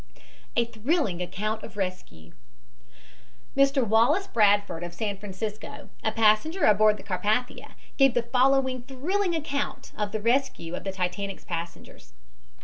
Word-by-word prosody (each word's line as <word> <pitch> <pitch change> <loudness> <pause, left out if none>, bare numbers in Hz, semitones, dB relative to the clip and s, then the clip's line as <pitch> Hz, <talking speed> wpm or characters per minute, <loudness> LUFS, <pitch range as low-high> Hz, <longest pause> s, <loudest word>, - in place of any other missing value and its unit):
A 235 - +3
THRILLING 230 - -1
ACCOUNT 215 +5 -3
OF - - -11
RESCUE 185 - -5 1.2
Mr. 275 -2 +3
Wallace 235 - +3
Bradford, 205 - +2
of 175 0 -7
San 205 +2 -2
Francisco, 210 +7 -6
a 220 - +1
passenger 225 - +2
aboard 215 0 +5
the - - -12
Carpathia, 210 +6 -2 0.2
gave 270 -3 +5
the 240 - +2
following 260 +1 +2
thrilling 340 +9 -1
account 285 -3 -3
of 210 -1 -2
the 220 - -2
rescue 230 -7 0
of - - -5
the 195 - -1
Titanic's 190 +1 -4
passengers. 170 - -7
220 Hz, 135 wpm, -26 LUFS, 200-270 Hz, 1.2 s, aboard